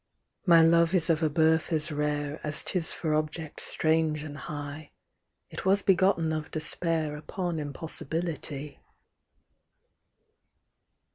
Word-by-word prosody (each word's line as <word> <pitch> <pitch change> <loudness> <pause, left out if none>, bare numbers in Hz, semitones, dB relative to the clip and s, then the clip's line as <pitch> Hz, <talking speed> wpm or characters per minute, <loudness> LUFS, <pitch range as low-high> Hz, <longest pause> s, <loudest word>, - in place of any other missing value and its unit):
" - - -54
My 165 -2 +7
love 170 +2 +4
is 175 -1 +3
of 160 0 0
a 160 - +2
birth 160 +2 +2
as 155 0 0
rare 150 0 -2
As 150 0 +2
'tis 175 -4 0
for 155 -3 -2
object 155 +1 -3
strange 155 -1 +1
and 145 -2 -7
high; 145 0 -7 0.6
It - - -6
was 195 +1 +3
begotten 185 -4 +3
of 155 -1 -4
Despair 155 -1 0
Upon 170 +2 -4
Impossibility." 150 0 -4
155 Hz, 125 wpm, -28 LUFS, 150-165 Hz, 0.6 s, My